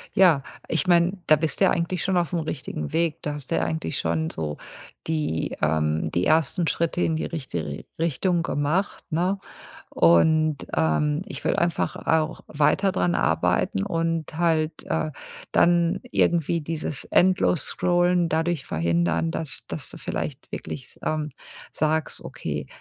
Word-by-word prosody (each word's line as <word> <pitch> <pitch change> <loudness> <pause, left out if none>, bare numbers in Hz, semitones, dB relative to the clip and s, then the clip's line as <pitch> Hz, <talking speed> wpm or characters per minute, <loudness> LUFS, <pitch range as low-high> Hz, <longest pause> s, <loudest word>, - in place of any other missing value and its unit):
Ja, 175 -7 +6 0.3
ich 165 +3 0
mein, 175 +2 +3
da 155 - +7
bist 155 +1 -1
du - - +7
ja - - +4
eigentlich 170 +1 -1
schon 190 -1 +1
aufm 175 0 0
richtigen 130 - -4
Weg. 165 -2 0
Da 150 - -3
hast 140 -3 -10
du - - +2
ja 80 - +1
eigentlich 80 -1 -2
schon 80 -1 0
so 75 -2 -4 0.5
die, 150 - -1
ähm 75 0 +1
die 85 - 0
ersten 160 +2 +2
Schritte 170 +2 0
in 160 - +1
die 155 - -2
richtige 85 - -5
Richtung 170 +2 +1
gemacht, 165 +5 -1
ne? 180 +5 +1 0.5
Und, 155 - +4 0.2
ähm, 145 - +1
ich - - -7
will - - +2
einfach 170 -1 0
auch 160 0 0
weiter 155 +6 +2
dran 90 - +1
arbeiten 95 - +1
und 165 0 -2
halt, 160 -2 +1
äh, 155 - -1 0.4
dann 175 +2 +3
irgendwie 170 0 +2
dieses 155 -4 -2
Endlos-Scrollen 180 -1 +2
dadurch 160 -2 0
verhindern, 85 0 +1
dass 140 - -4
dass 150 - -5
du - - -10
vielleicht 150 -3 -5
wirklich 130 - -5
s - - -12
ähm, 155 -1 -1 0.4
sagst, 155 0 0
okay, - - -5
155 Hz, 150 wpm, -25 LUFS, 125-170 Hz, 0.5 s, da